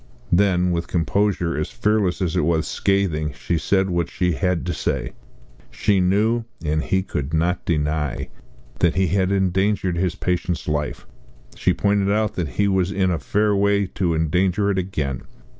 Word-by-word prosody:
Then 90 -1 +3
with 85 -1 -1
a - - -20
composure 90 0 0
as 75 - -2
fearless 105 -5 0
as 85 -3 -1
it - - +2
was 80 0 +1
scathing 85 -7 0
she 85 +4 -2
said 95 +4 +1
what 85 -1 0
she 90 -1 0
had 90 0 -1
to 90 - -1
say. - - -2 0.6
She 100 -2 +1
knew 105 +6 +2 0.2
and 75 +1 +1
he 95 -1 0
could 75 -4 -3
not 85 +3 0
deny 75 -2 -1 0.5
that 85 0 +2
he 95 -1 +2
had 95 0 +1
endangered 95 -1 +1
his 90 0 0
patient's 90 -1 -2
life. 75 -1 -2 0.5
She - - +1
pointed 100 -1 +1
out 105 0 +1
that 90 -3 -2
he 100 - +3
was 95 -1 +1
in 95 -2 +1
a 85 - -1
fair 105 0 +1
way 100 0 +2
to 90 -2 -1
endanger 90 +5 +1
it 95 - 0
again. 75 -9 -3
90 Hz, 175 wpm, -22 LUFS, 85-100 Hz, 0.6 s, Then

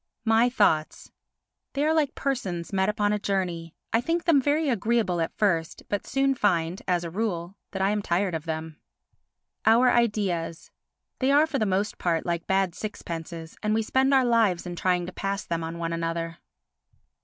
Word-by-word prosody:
My 225 +2 +4
Thoughts 160 -10 +1 0.6
They 285 +1 0
are 315 - +3
like 300 -3 +1
persons 195 -11 -3
met 190 +1 +2
upon 210 -1 +1
a 210 - 0
journey; 175 -5 -2 0.2
I 225 - +4
think 335 +6 -1
them 315 -6 +4
very 295 +3 +1
agreeable 220 -6 +1
at 165 - -3
first 170 -6 0
but 205 - -2
soon 270 0 +2
find, 180 -7 0
as 175 -2 +1
a 170 - -5
rule, 185 -3 -2
that 190 -1 -2
I 195 - +3
am 210 0 0
tired 185 0 0
of 160 -1 -4
them. 160 -1 -5 0.8
Our 240 +3 +5
Ideas 195 -8 0 0.5
They 265 +1 +2
are 290 +2 +6
for 295 -4 -2
the 215 - +1
most 195 +2 -1
part 165 -2 0
like 170 -1 -2
bad 190 -2 +1
sixpences 165 -5 -6
and 215 0 +1
we 225 - +1
spend 265 +5 +2
our 265 -2 +5
lives 225 -8 +2
in 175 -1 -5
trying 180 0 +1
to 180 - -6
pass 195 0 -3
them 165 -1 -2
on 165 +1 -5
one 165 0 -3
another. 165 0 -3
195 Hz, 185 wpm, -26 LUFS, 170-235 Hz, 0.8 s, are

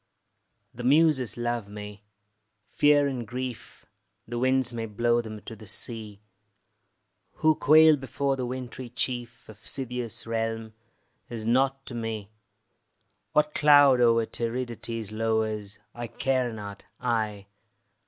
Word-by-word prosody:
The 125 - -8
Muses 135 -4 +3
love 120 -3 -2
me: 105 0 -9 0.7
fear 145 -1 +4
and 130 -5 -3
grief, 125 -1 -6 0.4
The 120 +1 -3
winds 130 -1 +2
may 115 -1 -3
blow 120 +3 +1
them 110 -2 -8
to 115 - -9
the 110 -1 -13
sea; 105 -1 -2 1.1
Who 155 0 +3
quail 155 0 +6
before 135 +1 -1
the 130 -2 -3
wintry 125 0 -6
chief 120 0 -3
Of 110 0 -14
Scythia's 125 -3 -1
realm, 115 -1 -3 0.6
is 115 -2 -6
nought 135 +3 +1
to - - -7
me. 110 -3 -4 1.0
What 150 0 +2
cloud 145 -4 +6
o'er 115 -1 +4
Tiridates 115 -2 -4
lowers, 110 -2 -1 0.2
I 120 0 -5
care 130 -1 0
not, 100 -2 -8 0.2
I. 110 -4 -1
120 Hz, 125 wpm, -27 LUFS, 110-130 Hz, 1.1 s, quail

